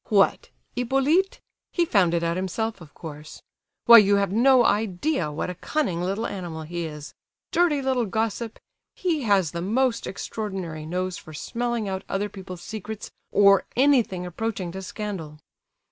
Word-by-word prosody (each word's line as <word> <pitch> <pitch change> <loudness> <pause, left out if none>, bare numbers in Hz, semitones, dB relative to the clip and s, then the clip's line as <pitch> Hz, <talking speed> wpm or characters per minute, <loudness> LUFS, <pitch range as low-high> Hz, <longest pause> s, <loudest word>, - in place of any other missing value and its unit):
"What, 200 -2 +3 0.3
Hippolyte? 270 +10 +2 0.3
He 345 - +2
found 185 - +3
it 170 - 0
out 170 0 0
himself, 195 +3 -2
of 155 -3 -12
course. 150 -2 -9 0.4
Why, 235 -1 +11
you 205 -1 +4
have 200 -1 +1
no 245 +3 +5
idea 205 - 0
what 155 +4 -3
a - - -5
cunning 180 - -1
little 195 +5 -1
animal 175 -6 -5
he 170 +2 -4
is; 150 -1 -8 0.4
dirty 320 -5 +2
little 255 -3 +1
gossip! 225 +2 -2 0.4
He 335 -5 0
has 195 -7 +3
the 170 - -4
most 235 +5 +1
extraordinary 185 -7 -5
nose 180 +1 -2
for 155 - -12
smelling 235 +4 -2
out 190 -1 -3
other 205 +2 -1
people's 185 -3 -9
secrets, 215 0 -7 0.2
or 200 -1 +6
anything 245 -9 +3
approaching 190 0 -3
to 190 +2 -6
scandal. 185 -6 -6
200 Hz, 155 wpm, -25 LUFS, 175-235 Hz, 0.4 s, Why